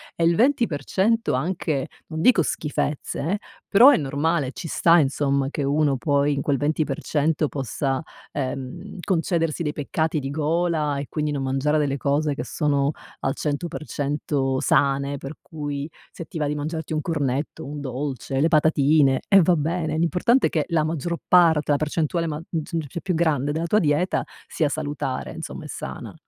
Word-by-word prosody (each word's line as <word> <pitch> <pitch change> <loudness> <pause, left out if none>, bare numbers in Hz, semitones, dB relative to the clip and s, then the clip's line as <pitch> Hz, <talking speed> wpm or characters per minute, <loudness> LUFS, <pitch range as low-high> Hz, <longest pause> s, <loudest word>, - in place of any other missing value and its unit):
e 170 - -1
il 170 0 +4
20% 230 - +1
anche, 150 -1 -1 0.2
non 160 0 -4
dico 225 -7 +5
schifezze 150 -1 -2
eh, 205 - +1 0.3
però 230 +7 +8
è 285 - +5
normale, 145 0 0
ci 165 - -7
sta 170 +2 +4
insomma 140 -1 +1
che 145 - -3
uno 140 -1 +2
poi 145 0 +2
in 140 - -1
quel 140 -2 +1
20% 150 +1 0
possa 135 0 -2 0.3
uhm, 135 +8 -5
concedersi 165 -3 0
dei 150 -1 -2
peccati 155 +2 -1
di 135 -1 -4
gola 155 -1 0
e 140 - -5
quindi 150 -1 -1
non 140 -2 -2
mangiare 135 +3 +1
delle 140 -1 0
cose 145 +1 0
che 120 - -4
sono 145 0 +1 0.3
al 135 - 0
100% 155 0 -4 0.6
sane. 140 0 +2
Per 135 +3 -8
cui, 145 -2 -5 0.2
se 170 - -8
ti 170 - -8
va 150 - 0
di 150 - -1
mangiarti 160 +2 -4
un 155 - 0
cornetto, 145 -3 -2
un 145 +2 -6
dolce, 135 0 -3
le 155 - +4
patatine, 150 -3 +4
eh 195 -1 +7
va 175 +1 +4
bene, 160 0 -1
l'importante 180 +10 +3
è - - -5
che 155 -3 0
la 165 -3 +1
maggior 165 +2 -2
parte 165 -4 +6
della 145 - +2
percentuale 160 +2 -1
magg 155 0 -4
g 165 -1 -2
cioè 170 - -6
più 185 -3 -1
grande 150 -4 +1
della 160 +2 -1
tua 210 +5 +3
dieta 155 +3 +1 0.2
sia 155 -3 0
salutare, 70 - -3
insomma, - - -7
e - - -8
sana. - - -7
150 Hz, 170 wpm, -23 LUFS, 140-165 Hz, 0.6 s, però